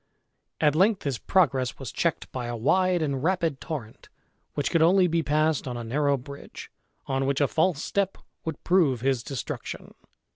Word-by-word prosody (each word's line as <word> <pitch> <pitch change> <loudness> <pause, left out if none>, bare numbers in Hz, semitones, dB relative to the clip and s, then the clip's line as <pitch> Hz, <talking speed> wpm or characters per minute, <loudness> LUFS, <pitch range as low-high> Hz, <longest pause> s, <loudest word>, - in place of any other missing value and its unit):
At 150 -2 +4
length 195 +6 +3
his 135 -5 -2
progress 135 -10 +2
was 135 -5 -6
checked 170 -2 -1
by 125 -2 -4
a 120 - -3
wide 180 +8 +2
and 140 -3 -1
rapid 170 -5 0
torrent, 135 -10 -7 0.5
which 145 - -1
could 165 - +3
only 180 +3 +5
be 165 -1 +1
passed 155 0 +1
on 125 -1 -4
a 120 - -5
narrow 140 +4 +1
bridge, 140 +2 -10 0.3
on 135 0 -1
which 140 0 +1
a 145 - +3
false 160 0 +1
step 200 -1 -1 0.3
would 160 -3 -5
prove 160 -10 +3
his 130 -2 +1
destruction. 125 -3 -6
145 Hz, 175 wpm, -26 LUFS, 135-170 Hz, 0.5 s, only